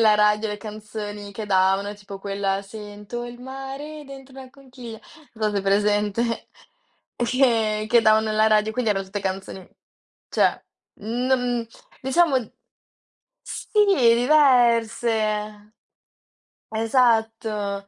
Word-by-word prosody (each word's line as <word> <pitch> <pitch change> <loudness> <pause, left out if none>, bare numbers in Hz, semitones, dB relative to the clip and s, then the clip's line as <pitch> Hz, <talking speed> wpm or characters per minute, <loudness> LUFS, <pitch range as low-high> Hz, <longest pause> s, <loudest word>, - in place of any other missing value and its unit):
la 215 -2 +5
radio, 210 +1 +3
le 210 - -3
canzoni 210 -1 -7
che 210 +1 -6
davano, 195 +1 +2
tipo 200 -1 -10
quella 195 0 -2
"sento 210 +3 -8
il 240 0 -9
mare 270 +3 -7
dentro 270 -1 -12
la 255 - -14
conchiglia", 255 -4 -11 0.4
non 215 -1 0
so, - - -2
hai 195 - 0
presente. 210 +3 0 0.7
E 240 - +1
che 225 -4 +2
che 235 0 +6
davano 220 0 +4
alla 215 0 +3
radio, 215 0 +3
quindi 230 -2 0
erano 195 -1 -1
tutte 200 +2 -5
canzoni, 190 -1 -5 0.6
cioè - - +2 0.4
non 245 +1 0 0.3
diciamo 280 +2 +3 1.1
sì, - - -8 0.6
diverse. 225 -6 +2 1.0
Esatto. 220 -3 0
220 Hz, 115 wpm, -23 LUFS, 205-245 Hz, 1.1 s, che